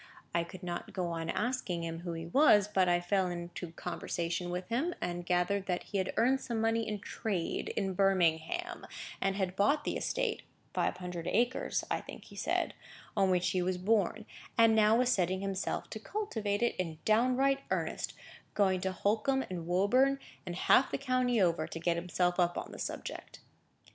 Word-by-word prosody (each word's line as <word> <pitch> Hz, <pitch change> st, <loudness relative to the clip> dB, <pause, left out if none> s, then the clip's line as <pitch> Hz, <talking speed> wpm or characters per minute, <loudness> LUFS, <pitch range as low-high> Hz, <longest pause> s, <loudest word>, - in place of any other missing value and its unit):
I 170 Hz, -, +2 dB
could 180 Hz, +2 st, -11 dB
not 175 Hz, -1 st, -5 dB
go 180 Hz, -3 st, -1 dB
on 165 Hz, 0 st, -3 dB
asking 210 Hz, -8 st, -1 dB
him 165 Hz, 0 st, -4 dB
who 170 Hz, 0 st, -4 dB
he 165 Hz, 0 st, -5 dB
was; 210 Hz, -, +5 dB
but 190 Hz, -3 st, +2 dB
I 175 Hz, 0 st, +4 dB
fell 185 Hz, +1 st, +1 dB
into 175 Hz, -1 st, -5 dB
conversation 175 Hz, 0 st, -3 dB
with 180 Hz, +1 st, -3 dB
him, 295 Hz, +10 st, 0 dB
and 175 Hz, 0 st, -2 dB
I -, -, -4 dB
gathered 180 Hz, +3 st, 0 dB
that 180 Hz, -1 st, -1 dB
he 200 Hz, -, -2 dB
had 185 Hz, -, -1 dB
earned 260 Hz, +4 st, +3 dB
some 235 Hz, -3 st, -2 dB
money 225 Hz, 0 st, +1 dB
in 210 Hz, -1 st, -2 dB
trade 195 Hz, -3 st, -3 dB
in 195 Hz, -1 st, 0 dB
Birmingham, 190 Hz, -, +1 dB, 0.3 s
and 195 Hz, 0 st, +1 dB
had 190 Hz, -2 st, -1 dB
bought 280 Hz, +10 st, +3 dB
the -, -, -2 dB
estate -, -, -1 dB, 0.3 s
(five -, -, 0 dB
hundred 180 Hz, -2 st, -5 dB
acres, 240 Hz, +6 st, +1 dB
I -, -, 0 dB
think -, -, -10 dB
he -, -, -14 dB
said,) -, -, 0 dB, 0.4 s
on 195 Hz, -2 st, +3 dB
which 180 Hz, -1 st, +2 dB
he 185 Hz, -, +1 dB
was 180 Hz, 0 st, 0 dB
born, 210 Hz, +2 st, +1 dB, 0.3 s
and 225 Hz, -1 st, +6 dB
now 215 Hz, 0 st, +5 dB
was 250 Hz, 0 st, +3 dB
setting 185 Hz, -2 st, +1 dB
himself 195 Hz, -1 st, -2 dB
to 220 Hz, -, -5 dB
cultivate 220 Hz, -, -2 dB
it 240 Hz, -, +2 dB
in 165 Hz, -4 st, -3 dB
downright 255 Hz, +5 st, +3 dB
earnest, -, -, -2 dB, 0.4 s
going 190 Hz, -3 st, +3 dB
to 190 Hz, -, 0 dB
Holkham 225 Hz, +8 st, +1 dB
and 170 Hz, -2 st, -4 dB
Woburn, 250 Hz, +10 st, +3 dB, 0.3 s
and 175 Hz, -, -3 dB
half 255 Hz, +8 st, +4 dB
the -, -, -1 dB
country 255 Hz, -3 st, +1 dB
over, 170 Hz, -4 st, +2 dB
to 165 Hz, -, -6 dB
get 170 Hz, +1 st, +1 dB
himself 175 Hz, +1 st, 0 dB
up 175 Hz, -1 st, +2 dB
on -, -, -5 dB
the -, -, -9 dB
subject." -, -, -6 dB
190 Hz, 190 wpm, -32 LUFS, 175-225 Hz, 0.4 s, and